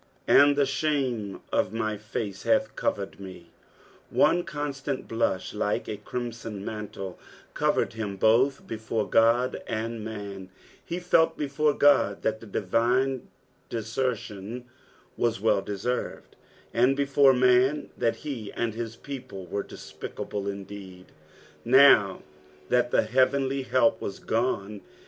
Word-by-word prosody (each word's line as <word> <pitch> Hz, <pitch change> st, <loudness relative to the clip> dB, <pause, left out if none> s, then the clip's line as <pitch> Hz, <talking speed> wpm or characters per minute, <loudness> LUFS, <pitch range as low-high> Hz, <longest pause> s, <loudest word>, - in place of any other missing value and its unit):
"And 145 Hz, 0 st, +6 dB
tie 145 Hz, -, +3 dB
ihame 130 Hz, -7 st, -1 dB
of 95 Hz, -, +1 dB
my 110 Hz, -1 st, -1 dB
fate 105 Hz, -1 st, -5 dB
hath 275 Hz, -1 st, +1 dB
ecvered 100 Hz, -1 st, -2 dB
me." 95 Hz, -3 st, -11 dB, 0.6 s
One 175 Hz, +1 st, +3 dB
constant 145 Hz, -3 st, -4 dB
blusb, 115 Hz, -5 st, -1 dB
like 105 Hz, 0 st, -1 dB
a 105 Hz, -, -4 dB
crimson 115 Hz, -2 st, -6 dB
mantle, 105 Hz, -3 st, -6 dB, 0.3 s
covered -, -, +1 dB
him 105 Hz, -3 st, -4 dB
both 125 Hz, +7 st, +3 dB
before 110 Hz, -1 st, -3 dB
Qod 120 Hz, +3 st, +3 dB
and 115 Hz, -1 st, -3 dB
man, 100 Hz, -3 st, -7 dB, 0.3 s
he 170 Hz, -, -4 dB
felt 175 Hz, -2 st, +3 dB
before 150 Hz, 0 st, +1 dB
God 145 Hz, -8 st, +4 dB
that 110 Hz, 0 st, 0 dB
the 115 Hz, -, -12 dB
divine 120 Hz, +7 st, 0 dB, 0.4 s
desertion 115 Hz, -1 st, -3 dB, 0.5 s
wna 120 Hz, -1 st, +2 dB
well 105 Hz, -1 st, +2 dB
deserred, 105 Hz, +6 st, -4 dB, 0.4 s
and 125 Hz, +4 st, +3 dB
before 140 Hz, -1 st, +5 dB
man, 125 Hz, +3 st, +3 dB
that 115 Hz, -, +1 dB
he 120 Hz, -8 st, -5 dB
and 115 Hz, -2 st, -2 dB
his 115 Hz, 0 st, -5 dB
people 130 Hz, -10 st, -8 dB
were 100 Hz, +3 st, -3 dB
despicable 80 Hz, +6 st, -7 dB
indeed 100 Hz, -2 st, -8 dB, 0.5 s
now 120 Hz, -6 st, +6 dB, 0.5 s
that 120 Hz, 0 st, +2 dB
heavenly 130 Hz, +4 st, +2 dB
help 130 Hz, -3 st, +2 dB
was 100 Hz, -, -4 dB
gone. 105 Hz, -3 st, -2 dB
115 Hz, 120 wpm, -27 LUFS, 105-130 Hz, 0.6 s, And